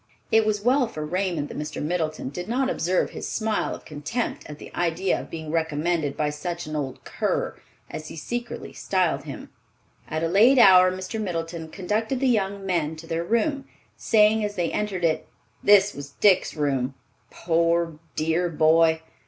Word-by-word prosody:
It 220 Hz, -1 st, +4 dB
was 210 Hz, -1 st, 0 dB
well 255 Hz, +1 st, +3 dB
for 155 Hz, -9 st, -6 dB
Raymond 175 Hz, -3 st, -1 dB
that -, -, -6 dB
Mr. 150 Hz, 0 st, -5 dB
Middleton 155 Hz, -3 st, -2 dB
did 175 Hz, +6 st, -6 dB
not 265 Hz, +2 st, +1 dB
observe 180 Hz, +2 st, 0 dB
his -, -, -6 dB
smile 220 Hz, -1 st, -1 dB
of -, -, -14 dB
contempt 155 Hz, +11 st, -3 dB
at 150 Hz, -, -8 dB
the -, -, -12 dB
idea 175 Hz, +2 st, 0 dB
of -, -, -12 dB
being 160 Hz, -2 st, -6 dB
recommended 160 Hz, -1 st, 0 dB
by 150 Hz, -1 st, 0 dB
such 170 Hz, +3 st, -5 dB
an 155 Hz, 0 st, -5 dB
"old 135 Hz, -3 st, -4 dB
cur," -, -, -2 dB, 0.3 s
as 155 Hz, -, -7 dB
he -, -, -8 dB
secretly 240 Hz, +9 st, -5 dB
styled -, -, 0 dB
him. -, -, -8 dB, 0.6 s
At 155 Hz, +1 st, -3 dB
a -, -, +2 dB
late 220 Hz, +10 st, +5 dB
hour 185 Hz, -5 st, +8 dB
Mr. 185 Hz, +4 st, -4 dB
Middleton 165 Hz, -4 st, -4 dB
conducted 215 Hz, +8 st, -2 dB
the 270 Hz, -, +2 dB
young 200 Hz, -4 st, 0 dB
men 165 Hz, -4 st, 0 dB
to 160 Hz, +1 st, -11 dB
their 165 Hz, 0 st, -2 dB
room, 270 Hz, -, 0 dB, 0.3 s
saying 215 Hz, 0 st, +3 dB
as 205 Hz, 0 st, -3 dB
they 175 Hz, -3 st, -1 dB
entered 195 Hz, -4 st, -1 dB
it, 160 Hz, -1 st, 0 dB, 0.4 s
"This 205 Hz, 0 st, +6 dB
was 140 Hz, 0 st, -8 dB
Dick's 200 Hz, -3 st, +4 dB
room, 135 Hz, -3 st, -1 dB, 0.3 s
poor 170 Hz, -1 st, 0 dB, 0.2 s
dear 165 Hz, +3 st, +1 dB
boy! 160 Hz, 0 st, +4 dB
175 Hz, 175 wpm, -25 LUFS, 155-210 Hz, 0.6 s, hour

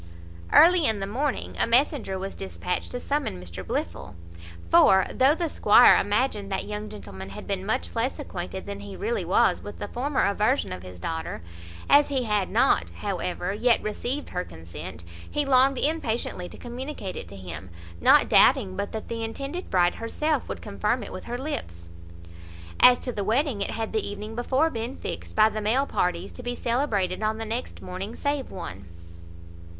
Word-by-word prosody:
Early 340 Hz, -1 st, +7 dB
in 220 Hz, -2 st, +1 dB
the 195 Hz, -, -2 dB
morning 260 Hz, +7 st, -2 dB
a -, -, +3 dB
messenger 240 Hz, -4 st, +2 dB
was 195 Hz, +1 st, -5 dB
despatched 190 Hz, -1 st, -3 dB
to 245 Hz, -, -4 dB
summon 285 Hz, -, -2 dB
Mr 90 Hz, +1 st, -8 dB
Blifil; 90 Hz, +2 st, -4 dB, 0.5 s
for, 190 Hz, -, +6 dB
though 270 Hz, +4 st, +4 dB
the 340 Hz, 0 st, -1 dB
squire 240 Hz, -5 st, +7 dB
imagined 205 Hz, -2 st, 0 dB
that 190 Hz, -, -1 dB
young 210 Hz, 0 st, -5 dB
gentleman 95 Hz, -, -9 dB
had 95 Hz, -, -9 dB
been 195 Hz, -2 st, -2 dB
much 255 Hz, +3 st, -1 dB
less 235 Hz, +4 st, 0 dB
acquainted 190 Hz, -, -6 dB
than 200 Hz, 0 st, -6 dB
he 200 Hz, -1 st, -8 dB
really 455 Hz, +3 st, -2 dB
was -, -, +3 dB
with -, -, -8 dB
the -, -, -5 dB
former 270 Hz, +3 st, 0 dB
aversion 210 Hz, +7 st, +1 dB
of 90 Hz, -, -7 dB
his 90 Hz, -1 st, -11 dB
daughter, 160 Hz, -, -4 dB, 0.4 s
as 290 Hz, +1 st, +6 dB
he 270 Hz, -3 st, 0 dB
had 210 Hz, -4 st, 0 dB
not, 240 Hz, +5 st, +3 dB
however, 185 Hz, -1 st, -2 dB
yet 235 Hz, +3 st, +3 dB
received 245 Hz, +7 st, -3 dB
her 180 Hz, -, -2 dB
consent, 80 Hz, -, -9 dB, 0.3 s
he 295 Hz, -1 st, 0 dB
longed 265 Hz, 0 st, +4 dB
impatiently 240 Hz, -, -1 dB
to -, -, -12 dB
communicate 245 Hz, -5 st, -6 dB
it -, -, -7 dB
to 100 Hz, -, -9 dB
him, 90 Hz, -2 st, -8 dB, 0.3 s
not -, -, +6 dB
doubting 95 Hz, -, +5 dB
but 205 Hz, -, -4 dB
that 220 Hz, -, -5 dB
the 230 Hz, -1 st, -4 dB
intended 275 Hz, +10 st, -5 dB
bride 175 Hz, -1 st, +3 dB
herself 300 Hz, +7 st, -1 dB
would -, -, -5 dB
confirm -, -, -1 dB
it -, -, -8 dB
with -, -, -7 dB
her 240 Hz, +1 st, -4 dB
lips. 85 Hz, -, -5 dB, 0.9 s
As 250 Hz, 0 st, +8 dB
to 250 Hz, -, -4 dB
the 205 Hz, -4 st, -3 dB
wedding, 230 Hz, +1 st, +1 dB
it -, -, -1 dB
had 225 Hz, -1 st, -4 dB
the 220 Hz, -, +1 dB
evening 210 Hz, +2 st, -6 dB
before 260 Hz, +7 st, +1 dB
been 230 Hz, +3 st, -4 dB
fixed, -, -, -6 dB
by 215 Hz, 0 st, +6 dB
the 215 Hz, 0 st, -4 dB
male 240 Hz, +7 st, +2 dB
parties, 180 Hz, -5 st, -1 dB
to -, -, -9 dB
be 245 Hz, 0 st, -3 dB
celebrated 225 Hz, -8 st, 0 dB
on 215 Hz, 0 st, 0 dB
the 225 Hz, -, -4 dB
next 230 Hz, +3 st, -5 dB
morning 190 Hz, +5 st, -6 dB
save 285 Hz, -2 st, -2 dB
one. 95 Hz, -, -8 dB
215 Hz, 185 wpm, -26 LUFS, 185-260 Hz, 0.9 s, As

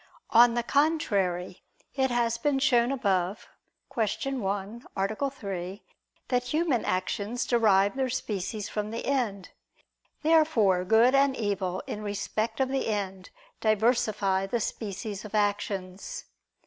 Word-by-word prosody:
On 235 Hz, 0 st, +6 dB
the 240 Hz, -, 0 dB
contrary, 200 Hz, -, 0 dB, 0.3 s
It 265 Hz, -1 st, +1 dB
has 235 Hz, -1 st, 0 dB
been 285 Hz, +2 st, +1 dB
shown 250 Hz, -3 st, +3 dB
above 195 Hz, -7 st, 0 dB, 0.5 s
(Q. 225 Hz, +4 st, -1 dB
1, 200 Hz, +3 st, -3 dB
A. 215 Hz, +8 st, 0 dB
3) 195 Hz, -6 st, -6 dB, 0.5 s
that 250 Hz, -1 st, +1 dB
human 300 Hz, -1 st, +1 dB
actions 200 Hz, +5 st, -1 dB
derive 205 Hz, -3 st, +3 dB
their 265 Hz, -1 st, 0 dB
species 210 Hz, -3 st, -3 dB
from 210 Hz, 0 st, -3 dB
the 230 Hz, +1 st, -5 dB
end. 225 Hz, -9 st, -1 dB, 0.7 s
Therefore 300 Hz, -, +4 dB
good 225 Hz, +6 st, +5 dB
and 275 Hz, -1 st, +3 dB
evil 190 Hz, -4 st, -2 dB
in 210 Hz, -, -5 dB
respect 210 Hz, +3 st, -3 dB
of 265 Hz, -1 st, +2 dB
the 270 Hz, 0 st, -1 dB
end 195 Hz, -3 st, -3 dB, 0.3 s
diversify 215 Hz, -3 st, +1 dB
the 235 Hz, +4 st, -1 dB
species 210 Hz, -1 st, -4 dB
of 215 Hz, 0 st, -7 dB
actions. 205 Hz, -, -2 dB
220 Hz, 125 wpm, -28 LUFS, 195-250 Hz, 0.7 s, On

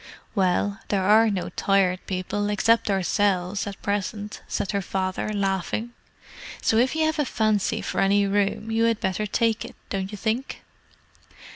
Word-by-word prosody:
"Well, 195 Hz, 0 st, +1 dB
there 195 Hz, -2 st, 0 dB
are 220 Hz, +3 st, +5 dB
no 195 Hz, -3 st, -2 dB
Tired 190 Hz, -2 st, +1 dB
People, 200 Hz, +2 st, -2 dB
except 225 Hz, +2 st, +2 dB
ourselves, 195 Hz, 0 st, +1 dB
at 200 Hz, -, -6 dB
present," 205 Hz, +1 st, -3 dB
said 195 Hz, -, -2 dB
her 200 Hz, -1 st, 0 dB
father, 190 Hz, +2 st, -2 dB
laughing. 200 Hz, +3 st, -1 dB, 0.7 s
"So 220 Hz, -, +2 dB
if 255 Hz, +5 st, +3 dB
you 320 Hz, 0 st, +2 dB
have 315 Hz, -1 st, 0 dB
a -, -, +4 dB
fancy 215 Hz, -5 st, 0 dB
for -, -, -1 dB
any 200 Hz, +1 st, +3 dB
room, 205 Hz, +2 st, 0 dB
you 225 Hz, +1 st, +2 dB
had 230 Hz, -2 st, +2 dB
better 190 Hz, +3 st, -1 dB
take 225 Hz, +1 st, +1 dB
it, -, -, -10 dB, 0.2 s
don't 195 Hz, 0 st, -2 dB
you 210 Hz, -, -6 dB
think?" 230 Hz, +6 st, -2 dB
205 Hz, 160 wpm, -25 LUFS, 195-220 Hz, 0.7 s, are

